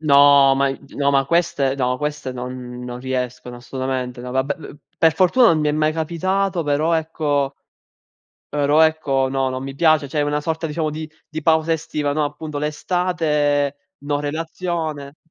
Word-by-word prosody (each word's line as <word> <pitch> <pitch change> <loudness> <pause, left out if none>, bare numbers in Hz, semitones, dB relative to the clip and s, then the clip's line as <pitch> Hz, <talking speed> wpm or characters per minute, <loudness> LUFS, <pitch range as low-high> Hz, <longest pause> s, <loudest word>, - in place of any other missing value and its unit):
No, 140 -2 +6
ma 140 +1 +2
i 135 - -4 0.2
no, 140 0 +2
ma 135 -1 +3
queste 155 -4 +1
no, 125 -2 0
queste 150 -2 -3
non 125 0 -7
non 125 0 -6
riescono 125 -1 -4
assolutamente. 130 0 -4
No, 125 0 -7
vabbè, 130 +2 0
p 155 - -11 0.2
per 160 -2 +4
fortuna 230 +7 +5
non 165 - +4
mi 150 - +1
è - - +1
mai 155 +1 +1
capitato, 180 +3 -1
però 150 +2 +1
ecco 150 -4 0 0.9
però 145 +1 +2
ecco 145 -4 +2
no, 135 -1 0
non 130 0 -4
mi 135 0 -6
piace, 155 -1 +3
cioè 150 +1 0
una 145 0 0
sorta 160 +2 -2
diciamo 155 0 -2
di 155 +1 -6 0.2
di 155 0 -5
pausa 160 +1 +3
estiva, 150 -2 -2
no 155 0 +1
appunto 150 +1 -5
l'estate, 150 -2 0 0.2
no 145 0 -2
relazione. 155 -1 -4
145 Hz, 170 wpm, -21 LUFS, 135-160 Hz, 0.9 s, No